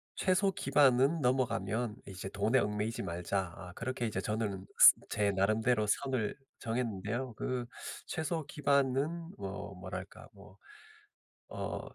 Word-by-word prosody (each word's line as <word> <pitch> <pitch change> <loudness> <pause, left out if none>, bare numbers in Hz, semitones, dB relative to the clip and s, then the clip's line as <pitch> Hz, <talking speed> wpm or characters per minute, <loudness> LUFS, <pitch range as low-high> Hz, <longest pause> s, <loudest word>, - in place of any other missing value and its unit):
'최소 190 +1 +2
기반은 140 0 +3
넘어가면 125 -3 0
이제 95 0 -6
돈에 110 +6 +2
얽매이지 105 +1 -1
말자.' 90 +1 -2
아 90 -1 -9
그렇게 120 0 -3
이제 105 -4 -2
저는 105 -2 -2
스 - - +10
제 105 -1 +1
나름대로 110 +4 +2
선을 130 -1 0 0.2
정했는데요. 115 +1 -2
그 125 -1 -2 0.4
최소 160 0 -2
기반은 145 +4 +1
뭐 100 0 -6
뭐랄까 95 +1 -8
뭐 100 -1 -16 1.0
어 - - -3
115 Hz, 260 characters per minute, -32 LUFS, 100-130 Hz, 1.0 s, 스